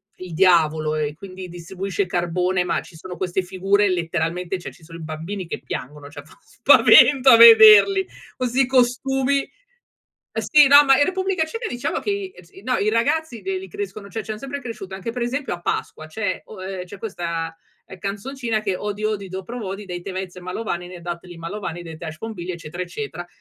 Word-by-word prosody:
il 185 -2 -9
diavolo 155 -3 +3
e 150 -1 -2
quindi 185 +2 -10
distribuisce 185 +3 -4
carbone, 180 +1 0
ma - - -1
ci 175 - -16
sono 180 +2 -9
queste 185 0 -1
figure 195 +3 +1
letteralmente, 175 +1 -2
cioè 175 - -8
ci 170 - -20
sono 165 +1 -11
i 165 - -9
bambini 165 +5 -6
che - - -5
piangono, 145 +2 -7
cioè 145 -1 -10
fa 150 - -20
spavento 260 +1 +6
a 230 - +9
vederli, 230 - +8 0.3
questi 255 +1 +1
costumi. 265 +2 +1 0.9
Sì, 295 -2 +4
no, 285 +1 +8
ma 270 -1 +5
in 290 - +4
Repubblica 375 -2 0
Ceca 455 +9 -5
diciamo 245 +3 -3
che 410 - -3
i 385 - -5
si 190 +3 -17
no, 255 +2 0
i 205 - 0
ragazzi 235 +4 0
l 380 0 -2
li 385 - -8
crescono, 395 - -7
cioè 220 +3 -5
ci 215 - -9
han 215 - -4
sempre 275 +4 -6
cresciuto, 225 -7 -8
anche 195 +4 -5
per 240 +1 -4
esempio 260 +1 -2
a 175 - -9
Pasqua, 155 -2 -4
c'è 200 +3 -3
o 195 -4 -11
ehm, 190 -1 -5
c'è 195 +2 -11
questa 170 -6 -4 0.4
canzoncina 220 +4 -3
che 200 -3 -2
odi 205 +1 -5
odi 210 -2 -2
dopro 190 +6 -7
vodi 200 -1 -6
dei 180 -2 -6
te 190 +2 -7
vez 185 -1 -6
malovani 180 -1 -5
ne 180 -1 -10
datli 175 0 -7
malovani 175 0 -6
de 165 -2 -9
tash 155 -1 -8
bombilia 185 -5 -6
eccetera 170 +2 -6
eccetera. 175 -2 -7
195 Hz, 190 wpm, -22 LUFS, 175-240 Hz, 0.9 s, a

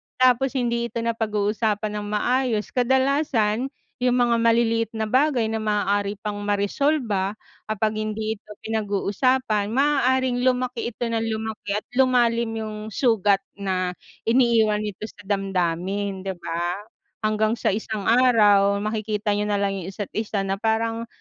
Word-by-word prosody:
Tapos 255 +1 +3
hindi 235 -2 0
ito 235 - -4
napag-uusapan 215 -1 -1
ng 205 - -5
maayos. 225 +1 0
Kadalasan, 260 -2 +1 0.4
yung 250 -1 +3
mga 240 -1 +3
maliliit 230 -1 +2
na 220 -1 -2
bagay 260 -3 +2
na 225 - -1
maaari 205 -1 0
pang 210 -1 -3
maresolba, 205 0 0 0.3
kapag 215 0 -1
hindi 215 0 -2
ito - - -43 0.2
pinag-uusapan, 215 +1 0
maaaring 260 -2 +2
lumaki 250 -2 0
ito 240 - -3
ng 225 0 -1
lumaki 220 -2 -4
at 210 - -2
lumalim 235 -3 +3
yung 215 -1 -5 0.2
sugat 205 -6 +3 0.2
na 185 -2 -1 0.3
iniiwan 225 -4 +3
nito 210 +1 -5
sa 205 - -16
damdamin, 195 0 -1
'di 190 -1 -4
ba? 170 +1 -3 0.5
Hanggang 215 +1 +1
sa - - +1
isang 215 -1 -3
araw, 210 -5 +5
makikita 215 0 -1
niyo 210 0 -1
na 205 - +1
lang 200 0 0
yung 175 - -7
isa't-isa 205 +1 -3
na 195 0 -2
parang 225 +1 0
220 Hz, 135 wpm, -23 LUFS, 205-235 Hz, 0.5 s, araw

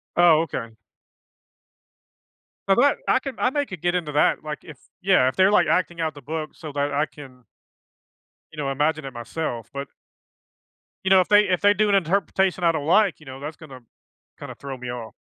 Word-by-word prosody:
Oh, 170 -3 +6
okay. 115 -8 -6 1.9
Now 195 - +4
that 280 +5 +3
I - - +4
can 270 -1 -6
I 250 - +2
may 285 +1 -1
could 185 - -9
get 175 0 0
into 165 -4 -2
that, 150 - +2
like, 150 -1 -5
if 155 -5 -12 0.2
yeah, 185 -9 +4
if 130 - -1
they're, 190 +1 +4
like, - - +4
acting 175 -2 0
out 160 -1 -1
the 145 - -12
book 155 +3 -5
so 155 - -9
that 145 0 -2
I 145 +2 +1
can 130 -5 -14 1.1
you - - -14
know, 140 -2 -2
imagine 150 +3 0
it 135 - -6
myself, 120 -1 -5
but 140 0 -5 1.2
you 190 - +1
know, 190 0 +7
if 180 - +2
they 205 0 +6
if 185 -4 0
they 205 0 +5
do 210 +1 +1
an 200 - +4
interpretation 190 0 +1
I 170 - +5
don't 150 -3 -3
like, 200 -1 +3
you 150 - -17
know, 135 -1 -9
that's 150 +2 -7
gonna 135 -5 -12 0.6
kinda - - -8
throw 135 -1 -7
me 125 0 -7
off. 120 -2 -7
160 Hz, 205 wpm, -23 LUFS, 140-190 Hz, 1.9 s, know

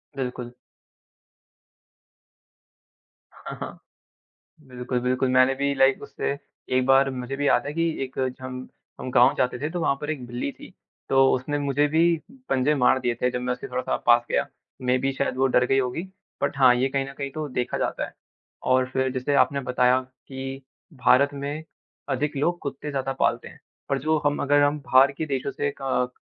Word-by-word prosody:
बिल्कुल। 125 -2 -4 2.8
हाँ, - - -8
हाँ। - - -6 0.9
बिल्कुल, 125 0 -3
बिल्कुल, 130 +1 0
मैंने 130 +1 +4
भी 140 +1 0
लाइक 135 0 +3
उससे 140 - -3 0.4
एक 130 - +3
बार 135 +1 +5
मुझे 130 +1 -5
भी 145 +1 -1
याद - - +3
है 145 - -3
कि 165 +2 +1 0.2
एक 130 - -10
जो 130 0 -2
हम 130 0 -6 0.3
हम 130 - -5
गाँव 125 +2 +5
जाते 125 -1 +1
थे 150 +2 -3
तो 175 +1 -3
वहाँ 140 - +2
पर 150 +1 -4
एक 130 -5 -4
बिल्ली 120 +3 -3
थी - - -14 0.4
तो 135 0 +5
उसने 145 +3 -2
मुझे 145 +1 +1
भी 160 +2 +2 0.5
पंजे 135 +3 +2
मार 130 -1 +4
दिए 120 -1 0
थे 125 - +3
जब 125 0 -3
मैं 125 0 -1
उससे 125 - -6
थोड़ा-सा 125 0 -1
पास 120 0 +6
गया, - - +1 0.4
मेबी 130 +2 +1
शायद 135 -1 -2
वो 135 +1 +3
डर 125 -1 +3
गई 135 +2 +2
होगी 130 +5 -1 0.4
बट - - 0
हाँ, 130 -2 +7
ये 130 +2 +1
कहीं 135 0 -1
न - - -8
कहीं 140 -1 -3
तो 155 0 -4
देखा 125 -2 -2
जाता - - -2
है। - - -13 0.5
और 130 0 +2
फिर 130 0 +1
जैसे 130 +2 -1
आपने 140 +1 +3
बताया 125 0 +2 0.3
कि 135 0 -6 0.4
भारत 140 +4 +5
में 145 +3 -5 0.4
अधिक 150 -1 -1
लोग 175 +5 0
कुत्ते 145 +1 -5
ज़्यादा 135 -1 -2
पालते - - +1
हैं, - - -17 0.3
पर 140 - +1
जो 155 +3 +1
हम 145 0 +1
अगर 145 +1 +4
हम 145 +1 +2
बाहर 135 0 +5
के 160 - 0
देशों 140 -1 -2
से 140 0 -2
क 125 -2 0
135 Hz, 190 wpm, -25 LUFS, 125-140 Hz, 2.8 s, हाँ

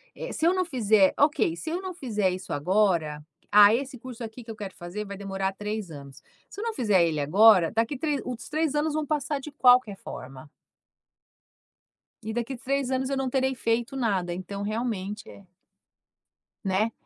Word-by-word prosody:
eh, - - -6
se 320 - +1
eu 350 - +4
não 370 -1 0
fizer 215 - +3
ok, 290 - +2
se 315 - -6
eu 340 +3 -2
não 375 -1 -5
fizer 215 - -1
isso 185 +1 -7
agora, 165 -2 +1 0.3
ah, 205 0 +8
esse 265 +2 -2
curso 250 -1 -8
aqui 225 +2 -8
que 230 - -16
eu - - -8
quero 200 -3 -7
fazer 175 +5 -6
vai 200 0 -7
demorar 195 -1 -3
3 210 -2 -5
anos. 140 -2 -11 0.3
Se - - -10
eu - - -3
não 460 -1 -2
fizer 210 - +3
ele 160 -2 -1
agora, 185 +3 +6
daqui 230 +5 0
tre 290 0 -1
os 250 -2 -6
3 310 -1 0
anos 300 +1 +1
vão 310 -1 -1
passar 295 -1 -1
de 295 +2 -9
qualquer 250 -6 +4
forma. 135 -3 -10 1.7
E 220 +1 -4
daqui 240 +3 -3
3 270 +1 -1
anos 260 0 0
eu 275 - -1
não 265 -1 -1
terei 265 0 +1
feito 235 +1 -1
nada, 195 -9 0
então 185 +3 -6
realmente 215 -2 -3
é 200 - -14 1.2
Né. 200 +3 +1
220 Hz, 185 wpm, -26 LUFS, 195-270 Hz, 1.7 s, ah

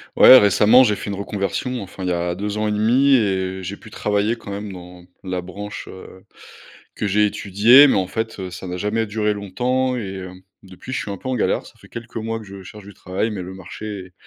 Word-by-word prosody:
Ouais, 130 - +10
récemment, 105 +4 +5
j'ai 105 -4 +2
fait 100 - -7
une - - -3
reconversion, 100 +5 -3
enfin 95 0 -9
il 90 - -1
y - - 0
a 85 0 -1
2 100 +3 -4
ans 110 0 0
et - - 0
1/2 120 +7 +3
et 95 -4 0
j'ai 95 +3 -6
pu 110 - -15
travailler, 105 +3 0
quand 100 - -10
même, 100 +1 -6
dans 90 -1 -12 0.2
la 90 -1 -3
branche, 100 +3 -8
heu, 95 0 -12 0.7
que - - -3
j'ai 105 +1 +3
étudiée, 105 +7 +6
mais - - +2
en 95 -1 0
fait, 110 +2 -4
heu, 95 -1 -5
ça 95 +1 -8
n'a 90 0 -4
jamais 105 +4 -1
duré 105 0 0
longtemps 125 +6 -1
et 95 -5 -5
heu, 95 -1 -7 0.3
depuis 95 +6 -11
je - - -1
suis 100 - -6
un 100 - -5
peu 130 - -7
en 130 - 0
galère. 120 - 0
Ça - - -15
fait - - -18
quelques 115 0 -10
mois 115 0 -3
que 110 - -11
je 100 -1 -11
cherche 105 +2 -12
du 100 - -12
travail 95 +4 -3
mais 100 -3 -5
le 95 +1 -8
marché 95 0 -8
100 Hz, 240 wpm, -21 LUFS, 95-110 Hz, 0.7 s, Ouais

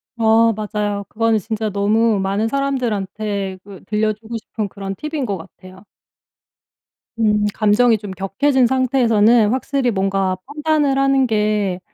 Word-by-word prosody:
어 225 0 +4
맞아요. 210 -1 -3
그거는 225 0 +1
진짜 220 +1 -3
너무 210 +2 +1
많은 195 +3 0
사람들한테 215 -7 -2
그 195 -2 -13
들려주고 215 +2 -2
싶은 215 -1 -5
그런 195 0 -6
팁인 300 0 -4
것 200 -4 -2
같아요. 185 +2 -14 1.4
음 210 -2 +2
감정이 220 +2 +3
좀 205 -2 -8
격해진 245 +8 +1
상태에서는 240 -4 +3
확실히 265 0 0
뭔가 195 -2 0
판단을 295 -1 0
하는 275 -1 +3
게 210 -4 0
215 Hz, 285 characters per minute, -19 LUFS, 200-245 Hz, 1.4 s, 어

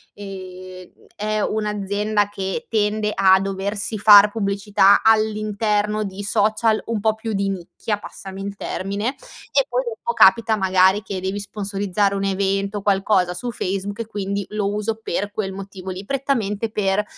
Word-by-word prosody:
ehm, 185 -2 -9 0.3
è 215 +1 -2
un'azienda 210 0 -1
che 195 -2 -4
tende 210 -1 0
a 190 -1 +5
doversi 200 +2 -3
far 205 0 +8
pubblicità 200 -1 +3
all'interno 215 -1 +1
di 200 0 -6
social 215 +2 +2
un 230 -2 -1
po' 220 +1 +2
più 220 0 -5
di 195 0 0
nicchia, 195 +3 -4
passami 195 -2 -9
il 200 0 -5
termine. 200 +3 -3 0.4
E, - - +3
poi - - 0
dopo 475 0 -4
capita, 230 - +5
magari, 190 0 +3
che 200 -3 -5
devi 190 +2 -3
sponsorizzare 200 -1 -1
un 195 - -2
evento, 195 +1 -1
qualcosa 195 -2 +2
su 240 +7 -4
Facebook, 200 0 -3
e - - -4
quindi, 200 -2 -3
lo 205 -1 -1
uso 210 +2 -2
per 205 0 -3
quel 200 -2 -3
motivo 190 -1 -8
lì, 185 +2 -6
prettamente 230 -5 -1
per 210 -1 0
205 Hz, 150 wpm, -21 LUFS, 195-215 Hz, 0.4 s, far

